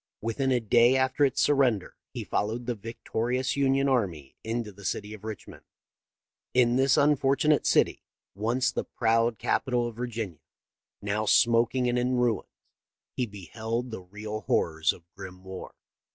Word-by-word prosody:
Within 125 +4 -1
a 125 - +3
day 120 +3 +4
after 130 +2 +1
its 135 - 0
surrender 130 -9 +2 0.2
he - - -5
followed 115 +4 -2
the 120 - -1
victorious 115 +3 -2
Union 135 0 +2
army 95 - -1
into 115 -1 -3
the 100 +1 -15
city 105 +3 -3
of 105 -1 -11
Richmond. 110 -2 -8 0.9
In 120 -1 +4
this 135 0 +4
unfortu 145 0 +3
nate 150 - +3
city - - +3 0.2
— - - -65
once 115 +6 0
the - - -2
proud 115 0 +1
capital 125 -3 0
of 120 -2 -5
Virginia 110 -10 -4 0.4
— - - -65
now 105 +1 -1
smoking 120 +3 +3
and 120 0 +1
in 125 +1 0
ruins, 120 -4 0 0.7
he 125 - -1
beheld 110 +5 -5
the 110 - -6
real 105 +3 -7
horrors 80 -1 +2
of 85 - -13
grim 95 -1 -10
war. 95 0 -9
115 Hz, 160 wpm, -27 LUFS, 105-125 Hz, 0.9 s, day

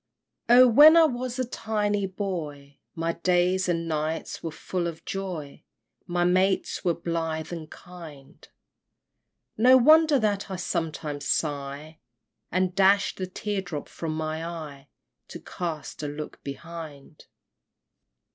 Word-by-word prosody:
Oh, 250 +1 +8
when 295 +7 +8
I 330 - +8
was 250 -4 -1
a 255 - 0
tiny 210 -4 -1
boy, 155 -8 -6 0.2
My 165 0 -1
days 180 +1 +1
and 165 -1 -1
nights 155 0 -3
were 165 - -4
full 170 +2 -3
of 165 -1 -8
joy, 180 -7 -6 0.4
My 175 0 0
mates 185 +3 +1
were 175 -3 +1
blithe 165 -1 -3
and 160 -2 -7
kind! 160 -6 -13 1.1
No 255 +3 +7
wonder 310 +3 +6
that 205 -4 -1
I 190 - -4
sometimes 155 -5 -3
sigh, 145 +1 -3 0.5
And 185 +1 0
dash 195 +1 +3
the 185 - -5
tear 200 +2 -3
drop 165 -6 -6
from 160 -2 -5
my 160 0 -3
eye, 155 -5 -7 0.4
To - - -9
cast 165 -5 -6
a 150 - -3
look 145 +1 -7
behind! 150 0 -9
170 Hz, 130 wpm, -26 LUFS, 155-195 Hz, 1.1 s, Oh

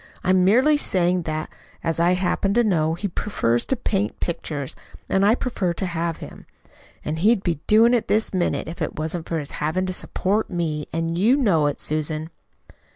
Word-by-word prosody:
"I'm 185 0 +3
merely 255 +10 +4
saying 180 -8 +1
that, 155 0 -3 0.3
as 165 -1 -1
I 175 +2 +4
happen 195 +2 0
to 240 - +4
know, 165 -6 +1
he 200 +4 -3
prefers 120 - 0
to 265 - 0
paint 205 -3 -2
pictures 150 -5 -4 0.3
and 195 - +2
I 210 +3 +5
prefer 195 -10 -2
to 190 - -2
have 170 -2 -2
him. - - -11 0.6
And 155 +1 -2
he'd 205 +2 +3
be 170 -5 -1
doing 225 +3 +5
it 240 - +1
this 215 0 +1
minute 180 -2 0
if 165 - -8
it - - -2
wasn't 160 +2 -3
for 165 - -1
his 145 -2 -5
having 160 +5 0
to 185 - -3
support 200 +3 -1
me, 160 -5 -2
and 165 +1 -2
you 235 +8 +4
know 180 - +3
it, 145 - -2
Susan." 155 +1 -2
175 Hz, 190 wpm, -23 LUFS, 160-205 Hz, 0.6 s, I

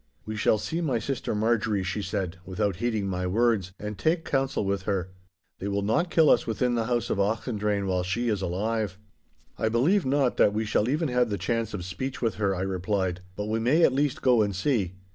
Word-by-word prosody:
'We 110 - -4
shall 110 - +3
see 165 +10 -3
my 140 -8 +1
sister 120 0 -3
Marjorie,' 110 -2 +1
she 100 +3 -2
said, 95 -2 -3
without 95 0 -2
heeding 110 -2 -1
my 90 -1 -2
words, 105 -2 +1
'and 105 -1 -6
take 160 +1 +1
counsel 135 -5 0
with 100 0 0
her. 95 -2 -1 0.5
They 100 - -4
will 100 0 -1
not 115 - +1
kill 160 -3 +5
us - - +3
within 120 +2 0
the 115 -1 0
house 120 -1 0
of - - 0
Auchendrayne 105 -1 0
while 90 -1 0
she 95 +7 -1
is 105 -4 0
alive.' 100 +2 -1 0.6
'I 110 - +1
believe 155 - +3
not 135 -1 +1
that 100 - +4
we 110 +1 0
shall 105 +1 +1
even 155 +2 0
have 125 -1 +2
the 100 - -1
chance 115 +3 -1
of 90 -4 -5
speech 130 +9 -4
with 115 -3 0
her,' 100 -1 +2
I 90 - -3
replied, 95 -1 -1
'but 105 - -3
we 110 +1 -1
may 135 +9 +3
at 130 - +5
least 140 0 0
go 125 -3 +5
and 100 -2 0
see. 100 -3 0
110 Hz, 220 wpm, -27 LUFS, 100-125 Hz, 0.6 s, kill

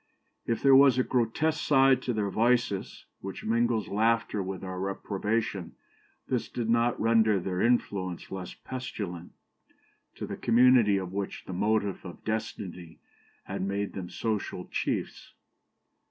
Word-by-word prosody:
If 115 - -1
there 135 -1 +7
was 135 -2 +7
a 130 - +3
grotesque 130 +7 0
side 135 -2 +5
to 125 - -2
their 105 -3 -1
vices 115 -2 0
which 95 0 -7
mingles 115 0 +1
laughter 110 0 +1
with 95 0 -5
our 95 -1 -5
reprobation, 100 +1 -2 0.5
this 125 -3 -1
did 115 -2 -2
not 120 +1 +2
render 110 -2 +3
their 90 0 -2
influence 100 -7 0
less 95 -2 -6
pestilent 100 -9 -6 0.8
to - - -5
the - - -6
community 120 -3 +5
of 95 -1 -4
which 100 -1 -4
the 95 - -6
motive 105 +1 0
of 90 - -10
destiny 95 -6 -4 0.5
had - - -5
made 100 +1 -2
them 90 -2 -6
social 105 -5 -3
chiefs. - - -3
110 Hz, 140 wpm, -28 LUFS, 95-120 Hz, 0.8 s, there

